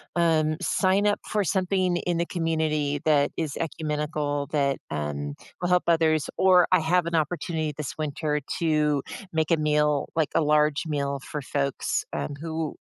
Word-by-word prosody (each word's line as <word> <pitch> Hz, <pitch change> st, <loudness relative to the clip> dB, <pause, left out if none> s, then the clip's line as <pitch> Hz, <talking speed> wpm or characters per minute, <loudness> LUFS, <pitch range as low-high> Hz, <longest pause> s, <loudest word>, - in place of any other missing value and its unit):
um, 160 Hz, -2 st, +2 dB
sign 195 Hz, +1 st, +2 dB
up 205 Hz, -, +2 dB
for 210 Hz, -1 st, 0 dB
something 185 Hz, 0 st, +1 dB
in 175 Hz, 0 st, -1 dB
the 170 Hz, -, 0 dB
community 155 Hz, -4 st, -1 dB
that 145 Hz, -2 st, +3 dB
is 155 Hz, -3 st, -3 dB
ecumenical 150 Hz, -2 st, -2 dB
that, 140 Hz, -2 st, +1 dB
um, 75 Hz, -1 st, -3 dB, 0.3 s
will 175 Hz, -, 0 dB
help 180 Hz, 0 st, +3 dB
others, 160 Hz, -2 st, +2 dB
or 185 Hz, -2 st, +6 dB
I 185 Hz, -, +6 dB
have 170 Hz, +2 st, +2 dB
an 170 Hz, -, -1 dB
opportunity 160 Hz, -1 st, -1 dB
this 150 Hz, -3 st, -5 dB
winter 150 Hz, 0 st, -1 dB, 0.2 s
to 150 Hz, -3 st, +2 dB, 0.3 s
make 160 Hz, +1 st, 0 dB
a 165 Hz, -, +5 dB
meal, 150 Hz, -1 st, +1 dB
like 160 Hz, -2 st, +1 dB
a -, -, +3 dB
large 150 Hz, +1 st, +2 dB
meal 140 Hz, -2 st, -1 dB
for 145 Hz, +2 st, -6 dB
folks, 140 Hz, 0 st, -1 dB
um, 145 Hz, -, -3 dB
who, 160 Hz, -1 st, -3 dB
155 Hz, 165 wpm, -26 LUFS, 145-170 Hz, 0.3 s, or